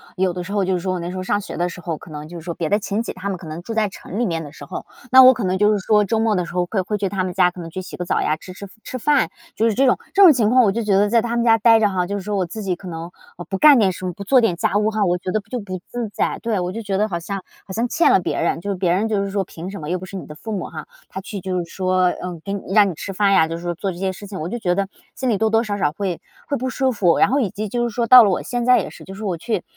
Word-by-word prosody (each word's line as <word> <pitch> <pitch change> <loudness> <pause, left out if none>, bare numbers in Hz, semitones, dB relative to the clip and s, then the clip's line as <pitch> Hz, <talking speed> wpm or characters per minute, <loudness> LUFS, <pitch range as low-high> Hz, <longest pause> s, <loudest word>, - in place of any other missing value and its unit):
有 185 -1 +1
的 180 - -5
时 200 - -6
候 200 - +1
就 190 - 0
是 180 - +1
说 185 +1 -2
我 180 - -3
那 170 +1 -4
时 185 - -6
候 - - -3
上 205 +2 0
学 - - -7
的 175 - 0
时 180 +1 -8
候， 165 -3 -4
可 165 - -14
能 150 0 -8
就 175 0 -8
是 160 - -13
说 170 - -3
别 165 -2 -3
的 205 - +2
亲 210 +2 -2
戚 - - -5
他 185 +2 -7
们 195 -2 -2
可 170 - -12
能 155 +2 -6
住 225 +6 -6
在 220 -2 +1
城 195 +2 -7
里 245 - +2
面 165 -5 -2
的 150 -1 -9
时 - - -12
候， - - -7 0.3
那 260 +1 +9
我 255 0 +9
可 245 - -4
能 185 0 0
就 210 +2 +4
是 205 - 0
说 210 -1 +4
周 220 +3 0
末 220 0 +2
的 180 - 0
时 170 - -10
候 180 0 +1
会 195 +3 -2
会 210 +3 -2
去 195 -2 -1
他 190 -2 -1
们 180 - -4
家 180 -1 +3
可 180 - -12
能 165 - -7
去 185 +3 -5
洗 - - -9
个 180 - -4
澡 - - 0
呀， 155 - 0
吃 185 +2 -11
吃 200 +1 -9 0.2
吃 255 - -5
饭， 290 +3 +2 0.2
就 225 - +1
是 220 - 0
这 270 - +3
种， 255 - +3
这 400 - +6
种 355 - +10
情 230 -6 +2
况 255 +1 +5
我 205 - +3
就 230 +4 -2
觉 210 -3 +1
得 205 +1 +3
在 230 0 +4
他 235 +1 -2
们 235 - +1
家 225 -1 +5
待 225 0 +6
着 210 - +4
哈。 180 -2 -1
就 200 +2 -2
是 - - -5
说 205 +1 -2
我 185 - +1
自 215 +5 -7
己 190 -2 0
可 185 - -11
能， 165 0 -6 0.3
呃， 175 - -6
不 195 - -2
干 295 +4 +7
点 200 -5 +3
什 185 +1 -7
么， 180 - -3
不 200 - -8
做 255 +6 +4
点 225 -7 +2
家 185 +3 0
务 210 +1 +2
哈， 215 -1 0
我 175 -1 +1
觉 185 - -6
得 215 - +1
就 250 - -3
不 185 -3 -6
自 240 -2 -3
在。 205 - -2
对， 225 -3 -1
我 180 0 -2
就 225 +4 -5
觉 205 -2 -3
得 210 +2 +1
好 170 - -2
像 195 +2 -5 0.2
好 190 - -7
像 230 +4 0
欠 330 - +3
了 - - +4
别 - - -2
人， 165 0 0
就 200 +2 -2
别 175 -2 +1
人 215 +4 0
就 205 -2 +1
是 - - -4
说， 195 0 -1
凭 170 +1 -8
什 195 -3 -7
么 150 - -6
又 180 +1 -1
不 185 - -8
是 195 - -10
你 185 - -6
的 150 - -10
父 220 +7 -6
母 200 - -3
哈。 - - -8 0.2
他 - - -6
去 195 0 -7
就 185 0 -2
是 170 - -6
说 185 0 +1 0.2
嗯， 180 -2 -5
给 200 - -3 0.2
让 205 -2 +6
你 180 - -4
吃 195 - -6
饭 195 +1 +2
呀， 160 - +5
就 165 - -3
是 - - -9
说 175 0 -2
做 195 +3 -3
这 175 - -9
些 190 +1 -1
事 205 - -10
情， 195 -1 -7
我 155 - -3
就 240 - -3
觉 180 -4 0
得， 195 0 0 0.3
心 260 -1 -2
里 210 - +1
多 220 +1 +1
多 225 +1 +3
少 205 -3 -3
少 150 - +1
会 180 +1 -4 0.3
会 285 - -1
不 260 +2 -2
舒 265 0 0
服。 190 -7 +2
然 - - +4
后 275 - +2
以 225 -8 0
及 215 +4 -4
就 240 +3 -1
是 225 - -7
说 235 - 0
到 250 +1 +10
了 205 - +3
我 185 - 0
现 245 -1 -2
在 250 0 +6
也 - - -4
是， - - -13
就 190 - -10
是 220 - -8
我 190 -4 -1
去 215 +1 -2
195 Hz, 395 characters per minute, -21 LUFS, 180-220 Hz, 0.3 s, 种